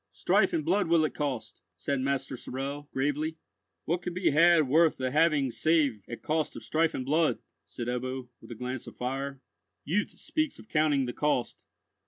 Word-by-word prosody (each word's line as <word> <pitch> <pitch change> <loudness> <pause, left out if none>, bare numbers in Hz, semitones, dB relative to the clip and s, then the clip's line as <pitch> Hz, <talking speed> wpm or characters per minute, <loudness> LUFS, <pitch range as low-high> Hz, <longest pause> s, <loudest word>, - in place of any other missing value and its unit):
"Strife - - +2
and 330 -3 -1
blood 200 -1 +2
will 165 -1 +4
it - - -3
cost," 140 -6 -4 0.2
said 140 -2 -1
Master 135 0 -1
Sorel, 140 +4 -5
gravely. 145 +4 -1 0.5
"What 170 +2 0
can 175 0 -5
be 185 - +2
had 165 0 +5
worth 160 +4 +4
the 130 -1 -2
having 150 -3 +3
save 135 -2 +2
at 120 - -7
cost 155 -1 -1
of - - -8
strife 160 +1 +1
and 130 - -3
blood?" 155 +3 +2 0.3
said 120 - -6
Ebbo, 125 +1 -3
with - - -14
a 120 - -6
glance 125 +2 -5
of - - -11
fire. 135 +2 -3 0.4
"Youth 195 +7 -1
speaks 310 -1 -2
of - - -14
counting 150 -4 +2
the 120 - -4
cost. 145 -4 -1
145 Hz, 185 wpm, -29 LUFS, 130-160 Hz, 0.5 s, had